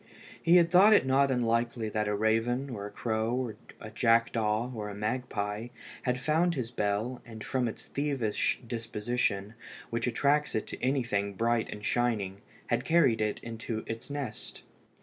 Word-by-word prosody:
He 170 Hz, -, +5 dB
had 170 Hz, -1 st, +5 dB
thought 195 Hz, +4 st, +8 dB
it 205 Hz, -, +5 dB
not 135 Hz, +1 st, +3 dB
unlikely 115 Hz, -2 st, 0 dB
that 105 Hz, 0 st, -1 dB
a 105 Hz, -, +1 dB
raven, 115 Hz, +5 st, +1 dB
or 100 Hz, -3 st, -5 dB
a -, -, -10 dB
crow, 110 Hz, +1 st, -1 dB
or 125 Hz, -4 st, -2 dB, 0.2 s
a 110 Hz, -, -9 dB
jackdaw, 115 Hz, 0 st, +2 dB
or 105 Hz, -3 st, -4 dB
a 100 Hz, -, -7 dB
magpie, 105 Hz, -1 st, -2 dB, 0.3 s
had 125 Hz, 0 st, 0 dB
found 165 Hz, +5 st, +2 dB
his 125 Hz, -4 st, -3 dB
bell, 110 Hz, +3 st, -1 dB
and 110 Hz, -2 st, -9 dB
from 130 Hz, -2 st, 0 dB
its 110 Hz, -, -7 dB
thievish 135 Hz, -7 st, 0 dB
disposition, 115 Hz, -2 st, -2 dB, 0.4 s
which 115 Hz, +1 st, -1 dB
attracts 145 Hz, +5 st, +2 dB
it 110 Hz, -, 0 dB
to -, -, -8 dB
anything 115 Hz, -7 st, 0 dB
bright 115 Hz, +2 st, +1 dB
and 105 Hz, 0 st, -7 dB
shining, 105 Hz, -6 st, 0 dB, 0.2 s
had 120 Hz, 0 st, 0 dB
carried 140 Hz, -10 st, +3 dB
it 105 Hz, -1 st, 0 dB
into 115 Hz, -1 st, -4 dB
its 115 Hz, +3 st, -6 dB
nest. 140 Hz, -5 st, -5 dB
115 Hz, 165 wpm, -30 LUFS, 110-130 Hz, 0.4 s, thought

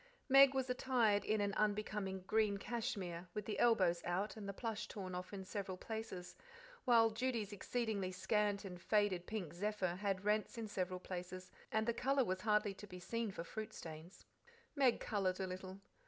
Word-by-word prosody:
Meg 275 Hz, 0 st, +8 dB
was 265 Hz, -1 st, +1 dB
attired 245 Hz, -5 st, +2 dB
in 215 Hz, -1 st, +1 dB
an 200 Hz, 0 st, +1 dB
unbecoming 210 Hz, -2 st, 0 dB
green 210 Hz, 0 st, +2 dB
cashmere, 195 Hz, -6 st, -3 dB
with 210 Hz, -2 st, -2 dB
the 210 Hz, -, -3 dB
elbows 185 Hz, -8 st, +4 dB
out 185 Hz, +4 st, -1 dB
and 205 Hz, -3 st, -6 dB
the -, -, 0 dB
plush 220 Hz, +1 st, -3 dB
torn 185 Hz, -3 st, -6 dB
off 180 Hz, 0 st, -5 dB
in 195 Hz, -2 st, -6 dB
several 190 Hz, -1 st, -4 dB
places, 220 Hz, -4 st, -5 dB, 0.5 s
while 230 Hz, -3 st, +6 dB
Judy's 225 Hz, -3 st, -1 dB
exceedingly 205 Hz, -3 st, -1 dB
scant 205 Hz, +2 st, +1 dB
and 180 Hz, -2 st, -7 dB
faded 205 Hz, -4 st, +2 dB
pink 200 Hz, -8 st, -3 dB
zephyr 185 Hz, -1 st, -1 dB
had 195 Hz, -1 st, -1 dB
rents 210 Hz, +2 st, +1 dB
in 225 Hz, -1 st, -3 dB
several 185 Hz, -2 st, -2 dB
places, 180 Hz, 0 st, -6 dB, 0.2 s
and 220 Hz, +1 st, +1 dB
the 235 Hz, -, +3 dB
colour 270 Hz, +3 st, +2 dB
was 185 Hz, 0 st, -1 dB
hardly 210 Hz, -1 st, +2 dB
to 205 Hz, +2 st, -10 dB
be 180 Hz, -1 st, -8 dB
seen 230 Hz, +4 st, -2 dB
for 180 Hz, -4 st, -5 dB
fruit 215 Hz, +5 st, -6 dB
stains. 160 Hz, +3 st, -9 dB, 0.5 s
Meg 265 Hz, -5 st, +4 dB
coloured 190 Hz, -3 st, 0 dB
a 190 Hz, -, 0 dB
little. 185 Hz, +1 st, -6 dB
205 Hz, 180 wpm, -38 LUFS, 185-220 Hz, 0.5 s, Meg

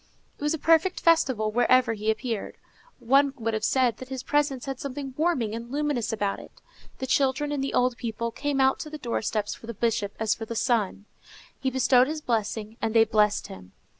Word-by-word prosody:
It -, -, -20 dB
was 295 Hz, +2 st, +1 dB
a -, -, -5 dB
perfect 330 Hz, +4 st, +3 dB
festival 260 Hz, -10 st, +2 dB
wherever 245 Hz, +1 st, +3 dB
he 215 Hz, 0 st, -3 dB
appeared. 220 Hz, -1 st, -2 dB, 0.4 s
One 275 Hz, +3 st, +3 dB
would 225 Hz, -2 st, -2 dB
have 215 Hz, -1 st, -2 dB
said 250 Hz, -1 st, +2 dB
that 255 Hz, -, -10 dB
his 260 Hz, -1 st, -5 dB
presence 285 Hz, -2 st, 0 dB
had 270 Hz, -2 st, -5 dB
something 275 Hz, -1 st, -5 dB
warming 285 Hz, -9 st, 0 dB
and 230 Hz, +1 st, -6 dB
luminous 290 Hz, -5 st, -1 dB
about 205 Hz, -2 st, -1 dB
it. -, -, -14 dB, 0.4 s
The 265 Hz, -, -4 dB
children 270 Hz, +2 st, +1 dB
and 285 Hz, -2 st, -1 dB
the 275 Hz, -, -2 dB
old 250 Hz, -1 st, +2 dB
people 235 Hz, 0 st, -3 dB
came 285 Hz, +2 st, -2 dB
out 265 Hz, 0 st, +3 dB
to 305 Hz, -, -6 dB
the 305 Hz, -, -7 dB
doorsteps 220 Hz, -5 st, -2 dB
for 230 Hz, -, -12 dB
the 235 Hz, -, -6 dB
Bishop 210 Hz, -2 st, -1 dB
as 220 Hz, -1 st, +2 dB
for 225 Hz, -, -6 dB
the 230 Hz, -, -6 dB
sun. 220 Hz, -4 st, 0 dB, 0.5 s
He 265 Hz, -, 0 dB
bestowed 260 Hz, 0 st, +4 dB
his 310 Hz, +1 st, -3 dB
blessing, 220 Hz, -3 st, -2 dB
and 225 Hz, 0 st, -1 dB
they 225 Hz, -, +7 dB
blessed 210 Hz, -1 st, +2 dB
him. 90 Hz, -1 st, -11 dB
250 Hz, 205 wpm, -26 LUFS, 220-275 Hz, 0.5 s, they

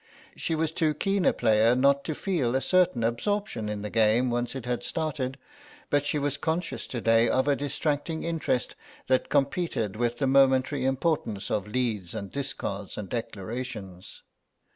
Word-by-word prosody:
She 165 Hz, -, -1 dB
was 160 Hz, 0 st, 0 dB
too 160 Hz, -2 st, +1 dB
keen 195 Hz, +4 st, 0 dB
a -, -, +6 dB
player 110 Hz, +1 st, +3 dB
not 140 Hz, +2 st, +3 dB
to 155 Hz, -, -2 dB
feel 140 Hz, -12 st, 0 dB
a 135 Hz, -, +2 dB
certain 180 Hz, -10 st, +3 dB
absorption 120 Hz, -, -1 dB
in 105 Hz, -1 st, -4 dB
the 105 Hz, -, -5 dB
game 115 Hz, +3 st, +3 dB
once 120 Hz, +2 st, -1 dB
it 130 Hz, -3 st, -5 dB
had 125 Hz, -1 st, -1 dB
started, 140 Hz, -5 st, -2 dB, 0.5 s
but 145 Hz, 0 st, +2 dB
she 150 Hz, -, +1 dB
was 145 Hz, -1 st, -1 dB
conscious 165 Hz, +1 st, -2 dB
to 120 Hz, -, -4 dB
day 115 Hz, +1 st, +4 dB
of 130 Hz, +2 st, +2 dB
a 145 Hz, -, +4 dB
distracting 145 Hz, +2 st, -2 dB
interest 165 Hz, -7 st, -1 dB, 0.3 s
that 130 Hz, 0 st, +1 dB
competed 140 Hz, -, 0 dB
with 120 Hz, +1 st, -1 dB
the 135 Hz, -, 0 dB
momentary 135 Hz, 0 st, +3 dB
importance 135 Hz, -, -1 dB
of 105 Hz, -1 st, -1 dB
leads 105 Hz, -6 st, -2 dB
and 100 Hz, -1 st, -5 dB
discards 105 Hz, -8 st, -4 dB
and 105 Hz, -3 st, -5 dB
declarations. 105 Hz, -4 st, -6 dB
130 Hz, 165 wpm, -27 LUFS, 115-150 Hz, 0.5 s, a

